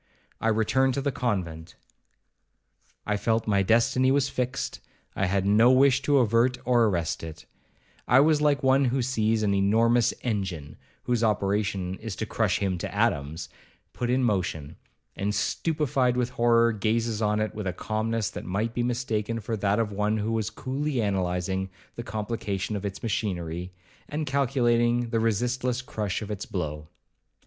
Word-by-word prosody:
I -, -, -1 dB
returned 120 Hz, +4 st, +2 dB
to 140 Hz, -, -1 dB
the 140 Hz, 0 st, 0 dB
convent—I 95 Hz, 0 st, -7 dB
felt 110 Hz, +2 st, 0 dB
my 100 Hz, -2 st, +2 dB
destiny 115 Hz, +5 st, +3 dB
was 135 Hz, 0 st, +2 dB
fixed—I 125 Hz, -6 st, -4 dB
had 95 Hz, 0 st, 0 dB
no 110 Hz, +4 st, +5 dB
wish 130 Hz, 0 st, +4 dB
to 140 Hz, +1 st, +2 dB
avert 120 Hz, +1 st, +3 dB
or 120 Hz, -1 st, +4 dB
arrest 85 Hz, -7 st, -1 dB
it—I 80 Hz, +9 st, -3 dB
was 150 Hz, +1 st, +4 dB
like 145 Hz, -2 st, +2 dB
one 135 Hz, +1 st, +4 dB
who 130 Hz, +1 st, +1 dB
sees 110 Hz, -3 st, +1 dB
an 100 Hz, -1 st, +2 dB
enormous 115 Hz, +4 st, +3 dB
engine 95 Hz, -, -3 dB, 0.3 s
(whose 120 Hz, -2 st, 0 dB
operation 100 Hz, -3 st, 0 dB
is 110 Hz, -3 st, -5 dB
to 110 Hz, -, -3 dB
crush 105 Hz, -3 st, 0 dB
him 95 Hz, -3 st, -1 dB
to -, -, -4 dB
atoms) 75 Hz, +4 st, -1 dB, 0.5 s
put 120 Hz, -, -3 dB
in 130 Hz, +1 st, +2 dB
motion, 90 Hz, -, -1 dB, 0.4 s
and, 100 Hz, +1 st, -2 dB
stupified 130 Hz, -, 0 dB
with 125 Hz, 0 st, 0 dB
horror, 115 Hz, -2 st, +3 dB
gazes 110 Hz, +1 st, -1 dB
on 105 Hz, 0 st, +1 dB
it 110 Hz, 0 st, -1 dB
with 105 Hz, -2 st, -5 dB
a -, -, 0 dB
calmness 110 Hz, +3 st, -2 dB
that -, -, -7 dB
might 105 Hz, +5 st, -2 dB
be 120 Hz, -, -1 dB
mistaken 115 Hz, -2 st, -1 dB
for 110 Hz, +1 st, -3 dB
that 100 Hz, -1 st, +1 dB
of 115 Hz, -2 st, 0 dB
one 105 Hz, +2 st, 0 dB
who 110 Hz, +1 st, -2 dB
was 110 Hz, -3 st, -1 dB
coolly 135 Hz, +1 st, -3 dB
analysing 95 Hz, -2 st, -1 dB, 0.3 s
the -, -, -5 dB
complication 105 Hz, -2 st, -3 dB
of 100 Hz, 0 st, -3 dB
its 95 Hz, -, -8 dB
machinery, 90 Hz, -5 st, -3 dB, 0.4 s
and 150 Hz, +1 st, -2 dB
calculating 120 Hz, -3 st, +1 dB
the 115 Hz, -, +1 dB
resistless 125 Hz, +3 st, 0 dB
crush 105 Hz, -4 st, -3 dB
of 105 Hz, -, -6 dB
its 105 Hz, -1 st, -5 dB
blow. 75 Hz, -4 st, -4 dB
110 Hz, 155 wpm, -26 LUFS, 100-125 Hz, 0.5 s, no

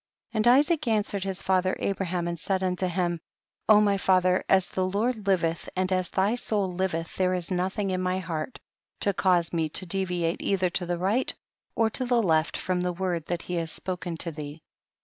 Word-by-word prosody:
54. 220 Hz, -, -2 dB
And -, -, +7 dB
Isaac 305 Hz, -2 st, +1 dB
answered 210 Hz, -3 st, 0 dB
his 195 Hz, -1 st, -4 dB
fath 185 Hz, -1 st, +2 dB
er 185 Hz, -, 0 dB
Abraham 185 Hz, -3 st, -2 dB
and 170 Hz, -1 st, -3 dB
said 190 Hz, +2 st, -1 dB
unto 185 Hz, 0 st, 0 dB
him, 175 Hz, -2 st, -1 dB, 0.5 s
O 215 Hz, -1 st, +8 dB
my 200 Hz, -1 st, +3 dB
fatlier, 185 Hz, -1 st, +3 dB
as 190 Hz, -1 st, +4 dB
the 185 Hz, -, -2 dB
Lord 210 Hz, +4 st, -1 dB
livcth 170 Hz, -4 st, 0 dB
and 185 Hz, 0 st, 0 dB
as 185 Hz, -1 st, +1 dB
thy 195 Hz, +3 st, +1 dB
soul 210 Hz, -6 st, 0 dB
liveth 175 Hz, -3 st, -2 dB
there 185 Hz, -1 st, +2 dB
is 180 Hz, 0 st, -2 dB
nothing 190 Hz, +2 st, -1 dB
in 185 Hz, 0 st, -1 dB
my 185 Hz, 0 st, 0 dB
heart 170 Hz, +4 st, -4 dB, 0.4 s
to 200 Hz, -, +2 dB
cause 175 Hz, -3 st, +2 dB
me 160 Hz, -2 st, 0 dB
to 185 Hz, -, 0 dB
deviate 175 Hz, -2 st, -1 dB
either 185 Hz, -2 st, +1 dB
to 175 Hz, 0 st, -2 dB
the 175 Hz, 0 st, -1 dB
right 200 Hz, +9 st, +1 dB, 0.4 s
or 225 Hz, -1 st, +2 dB
to 255 Hz, -, +1 dB
the 245 Hz, -2 st, +2 dB
left 160 Hz, -3 st, +2 dB
from 180 Hz, -1 st, -1 dB
the 180 Hz, 0 st, 0 dB
word 175 Hz, -3 st, -2 dB
that 175 Hz, -1 st, -2 dB
he 180 Hz, -, -6 dB
has 165 Hz, -1 st, -2 dB
spoken 180 Hz, -2 st, -4 dB
to 170 Hz, -, -1 dB
thee. 150 Hz, 0 st, -8 dB
185 Hz, 205 wpm, -27 LUFS, 175-195 Hz, 0.5 s, O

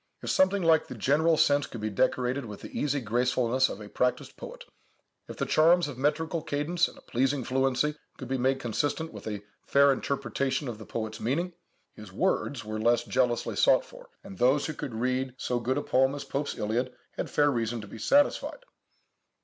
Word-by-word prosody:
If -, -, -1 dB
something 190 Hz, 0 st, +3 dB
like 160 Hz, -1 st, +4 dB
the -, -, -7 dB
general 155 Hz, +8 st, +2 dB
sense 145 Hz, -1 st, +3 dB
could 115 Hz, -, -8 dB
be 110 Hz, 0 st, -3 dB
decorated 125 Hz, +4 st, 0 dB
with 105 Hz, -3 st, -9 dB
the -, -, -9 dB
easy 145 Hz, -1 st, 0 dB
gracefulness 125 Hz, +2 st, +1 dB
of -, -, -6 dB
a 105 Hz, -, -9 dB
practised 125 Hz, +4 st, -1 dB
poet; -, -, -10 dB, 0.6 s
if -, -, -9 dB
the -, -, -1 dB
charms 170 Hz, +1 st, +4 dB
of 145 Hz, -, -6 dB
metrical 160 Hz, +3 st, 0 dB
cadence 160 Hz, +3 st, 0 dB
and -, -, -14 dB
a -, -, -15 dB
pleasing 135 Hz, +2 st, 0 dB
fluency 135 Hz, +3 st, +1 dB, 0.2 s
could 130 Hz, -, -7 dB
be 130 Hz, +1 st, -1 dB
made 130 Hz, +2 st, +1 dB
consistent 145 Hz, +6 st, -2 dB
with -, -, -9 dB
a 105 Hz, -2 st, -4 dB, 0.2 s
fair 140 Hz, 0 st, +5 dB
interpretation 140 Hz, 0 st, -2 dB
of 115 Hz, -3 st, -5 dB
the 110 Hz, -, -10 dB
poet's 110 Hz, -1 st, -4 dB
meaning, 170 Hz, +9 st, -1 dB, 0.4 s
his 105 Hz, -3 st, -12 dB
words 140 Hz, -, -1 dB
were 110 Hz, 0 st, -4 dB
less 120 Hz, +1 st, +3 dB
jealously 125 Hz, -1 st, 0 dB
sought -, -, +4 dB
for, -, -, -14 dB
and 195 Hz, -1 st, -11 dB
those 130 Hz, +4 st, +3 dB
who 155 Hz, -, -3 dB
could 130 Hz, -5 st, -6 dB
read 130 Hz, +2 st, -1 dB
so 125 Hz, -1 st, -1 dB
good 130 Hz, +2 st, -1 dB
a -, -, -1 dB
poem 130 Hz, +2 st, +2 dB
as 145 Hz, -, -5 dB
Pope's 145 Hz, +1 st, -3 dB
Iliad 120 Hz, +5 st, -1 dB, 0.2 s
had -, -, -5 dB
fair 145 Hz, -1 st, +3 dB
reason 115 Hz, -1 st, -1 dB
to 105 Hz, -, -10 dB
be 110 Hz, -, -10 dB
satisfied. 290 Hz, -, +2 dB
130 Hz, 200 wpm, -28 LUFS, 120-150 Hz, 0.6 s, fair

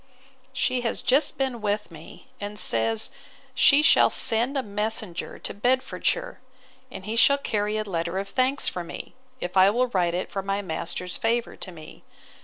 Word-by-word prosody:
She 255 Hz, -1 st, 0 dB
has 235 Hz, -, -3 dB
just 275 Hz, +4 st, +2 dB
been 260 Hz, -4 st, -2 dB
with 210 Hz, -2 st, -2 dB
me, 160 Hz, +9 st, -13 dB
and 205 Hz, 0 st, -6 dB
says 115 Hz, -, +3 dB, 0.4 s
she 280 Hz, +3 st, +5 dB
shall 325 Hz, -, +6 dB
send 235 Hz, +5 st, +3 dB
a 265 Hz, -, -1 dB
messenger 210 Hz, -3 st, -3 dB
to -, -, -4 dB
Bedfordshire; 250 Hz, +6 st, -1 dB, 0.5 s
and 190 Hz, -, -9 dB
he 215 Hz, +2 st, -3 dB
shall 280 Hz, +4 st, +5 dB
carry 210 Hz, -5 st, -2 dB
a 215 Hz, -, -1 dB
letter 170 Hz, -2 st, -3 dB
of 195 Hz, 0 st, -3 dB
thanks 260 Hz, +6 st, 0 dB
for 180 Hz, -, -3 dB
me, 170 Hz, -, -9 dB, 0.3 s
if 175 Hz, +1 st, -5 dB
I 190 Hz, +1 st, +7 dB
will 245 Hz, +4 st, +1 dB
write 175 Hz, -5 st, 0 dB
it 180 Hz, -, -4 dB
for 195 Hz, -, -3 dB
my 195 Hz, +1 st, -2 dB
master's 180 Hz, +1 st, -4 dB
favour 230 Hz, +1 st, -1 dB
to 185 Hz, -, -7 dB
me. 160 Hz, -3 st, -13 dB
210 Hz, 175 wpm, -25 LUFS, 185-245 Hz, 0.5 s, I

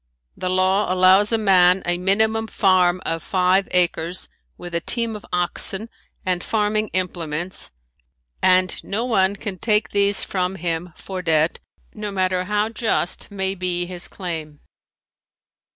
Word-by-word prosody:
The 185 Hz, -, -3 dB
law 185 Hz, +2 st, +2 dB
allows 185 Hz, +3 st, +5 dB
a 225 Hz, -, +3 dB
man 190 Hz, -3 st, +4 dB
a 175 Hz, 0 st, 0 dB
minimum 220 Hz, +4 st, +2 dB
farm 185 Hz, -3 st, +2 dB
of 165 Hz, 0 st, -2 dB
five 185 Hz, +1 st, +2 dB
acres 175 Hz, 0 st, 0 dB, 0.3 s
with 175 Hz, -1 st, -9 dB
a 170 Hz, -, +1 dB
team 230 Hz, +3 st, +2 dB
of 210 Hz, -, -9 dB
oxen 190 Hz, +4 st, -1 dB, 0.4 s
and 180 Hz, -1 st, 0 dB
farming 215 Hz, 0 st, 0 dB
implements 175 Hz, -2 st, -3 dB, 0.7 s
and 185 Hz, -1 st, +2 dB
no 220 Hz, +4 st, -2 dB
one 200 Hz, -5 st, +2 dB
can 195 Hz, -3 st, -6 dB
take 215 Hz, -1 st, +1 dB
these 200 Hz, 0 st, +3 dB
from 185 Hz, 0 st, -2 dB
him 170 Hz, 0 st, -3 dB
for 190 Hz, -1 st, -6 dB
debt 160 Hz, -2 st, +1 dB, 0.3 s
no 210 Hz, -1 st, -5 dB
matter 185 Hz, -1 st, 0 dB
how 210 Hz, +2 st, 0 dB
just 225 Hz, -5 st, -1 dB
may 190 Hz, -1 st, -1 dB
be 180 Hz, -2 st, -2 dB
his 175 Hz, -1 st, -5 dB
claim. 160 Hz, -5 st, -6 dB
185 Hz, 140 wpm, -21 LUFS, 180-205 Hz, 0.7 s, allows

